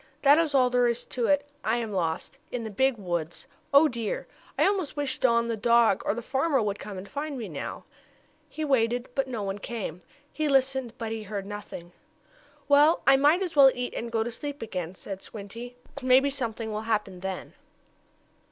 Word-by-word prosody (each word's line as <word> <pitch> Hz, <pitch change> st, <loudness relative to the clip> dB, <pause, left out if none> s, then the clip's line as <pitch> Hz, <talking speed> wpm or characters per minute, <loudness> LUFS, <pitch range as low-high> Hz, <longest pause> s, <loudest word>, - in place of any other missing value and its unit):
That 285 Hz, +2 st, +7 dB
is 310 Hz, -4 st, +1 dB
all 255 Hz, -2 st, +4 dB
there 245 Hz, -1 st, +3 dB
is 235 Hz, 0 st, -1 dB
to 240 Hz, -2 st, -2 dB
it 285 Hz, 0 st, +2 dB, 0.2 s
I 225 Hz, +2 st, +1 dB
am 230 Hz, -3 st, -3 dB
lost 175 Hz, +8 st, -2 dB
in 245 Hz, -2 st, -3 dB
the 220 Hz, -, -5 dB
big 265 Hz, +4 st, +2 dB
woods! 175 Hz, -4 st, -4 dB, 0.3 s
Oh 285 Hz, +3 st, +7 dB
dear! 235 Hz, -6 st, -3 dB, 0.3 s
I -, -, +4 dB
almost 380 Hz, -7 st, 0 dB
wish 280 Hz, -3 st, -1 dB
Don, 235 Hz, -2 st, +3 dB
the 230 Hz, -, -1 dB
dog, 235 Hz, -2 st, +4 dB
or 200 Hz, -, +2 dB
the 235 Hz, -, -5 dB
farmer 270 Hz, +3 st, +1 dB
would 205 Hz, -2 st, -1 dB
come 205 Hz, -2 st, -7 dB
and 185 Hz, +2 st, -7 dB
find 285 Hz, +5 st, -4 dB
me 230 Hz, -4 st, -5 dB
now." 150 Hz, -6 st, -6 dB, 0.7 s
He 315 Hz, -, -4 dB
waited, 245 Hz, -3 st, +1 dB
but 270 Hz, 0 st, 0 dB
no 235 Hz, -5 st, -4 dB
one 195 Hz, +1 st, -3 dB
came. 195 Hz, -6 st, -5 dB, 0.3 s
He 310 Hz, -1 st, -1 dB
listened 265 Hz, -3 st, +2 dB
but 225 Hz, -1 st, -4 dB
he 225 Hz, -1 st, -3 dB
heard 200 Hz, -1 st, -5 dB
nothing. 200 Hz, -4 st, -8 dB, 0.8 s
"Well, 290 Hz, +3 st, +5 dB
I 270 Hz, -, +7 dB
might 295 Hz, +7 st, +4 dB
as 355 Hz, -4 st, -4 dB
well 275 Hz, -2 st, +9 dB
eat 250 Hz, 0 st, -3 dB
and 235 Hz, 0 st, -4 dB
go 225 Hz, -1 st, +1 dB
to 240 Hz, -, -4 dB
sleep 285 Hz, +2 st, -6 dB
again," 185 Hz, -5 st, -5 dB
said 195 Hz, 0 st, -7 dB
Squinty, 230 Hz, +4 st, -9 dB, 0.3 s
"Maybe 260 Hz, +2 st, +4 dB
something 230 Hz, -4 st, -3 dB
will 215 Hz, 0 st, -3 dB
happen 210 Hz, -4 st, -1 dB
then." 190 Hz, 0 st, -5 dB
235 Hz, 200 wpm, -27 LUFS, 210-270 Hz, 0.8 s, well